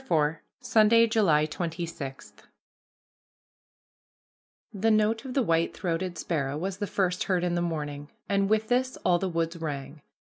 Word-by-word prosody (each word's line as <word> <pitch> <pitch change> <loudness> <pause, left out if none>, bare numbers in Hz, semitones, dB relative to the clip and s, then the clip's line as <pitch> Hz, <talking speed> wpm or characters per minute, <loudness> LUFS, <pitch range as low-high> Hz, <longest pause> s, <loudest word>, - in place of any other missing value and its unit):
IV 160 - +1 0.2
SUNDAY, 230 -1 +5
JULY 195 -10 +3
26 165 -4 -5 2.4
The 210 +2 +1
note 220 +1 +2
of 255 - -6
the 270 - +3
white 165 -4 +1
throated 175 -1 -2
sparrow 145 -5 -2
was 190 +4 -3
the 205 0 -3
first 185 -2 0
heard 180 -2 +1
in 175 -1 0
the 175 - 0
morning, 150 -4 -4 0.2
and 200 -1 +1
with 220 0 +2
this 255 +2 0
all 175 -1 +4
the 190 - -1
woods 165 0 -2
rang. 145 -2 -5
175 Hz, 145 wpm, -27 LUFS, 160-210 Hz, 2.4 s, SUNDAY